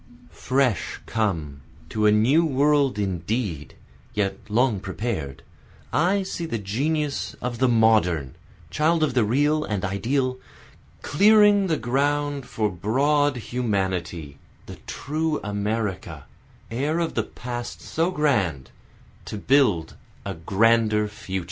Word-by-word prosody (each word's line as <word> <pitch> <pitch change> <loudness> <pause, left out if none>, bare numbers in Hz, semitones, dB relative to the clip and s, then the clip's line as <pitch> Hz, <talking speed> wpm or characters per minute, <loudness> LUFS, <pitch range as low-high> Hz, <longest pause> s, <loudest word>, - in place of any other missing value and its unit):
Fresh 130 - 0
come, 80 -10 -2 0.3
to 105 -1 +1
a - - +6
new 125 +10 +4
world 140 -4 +2
indeed, 95 - -3 0.4
yet 100 -2 0
long 115 -1 +2
prepared, 95 - -4 0.5
I 190 +5 +2
see 170 -3 -4
the 115 - -2
genius 140 +9 -2
of 120 -1 -4
the 130 - +4
modern, 110 - +3 0.4
child 155 - +2
of 145 -4 +1
the 125 -2 +3
real 145 +7 +2
and 105 -5 -2
ideal, 130 +7 -1 0.6
Clearing 205 +3 +5
the 160 -3 +1
ground 140 +2 -1
for 110 -1 -1
broad 135 - +1
humanity, 95 - -3 0.3
the - - -10
true 155 +2 -2
America, 105 -1 -3 0.5
heir 145 +7 -1
of 170 -1 -1
the - - +1
past 120 -1 -6
so 165 +2 -1
grand, 110 - 0 0.5
To 110 - -6
build 105 - +2 0.3
a - - -3
grander 105 +4 +2
future. 95 -2 -5
115 Hz, 120 wpm, -24 LUFS, 100-145 Hz, 0.6 s, a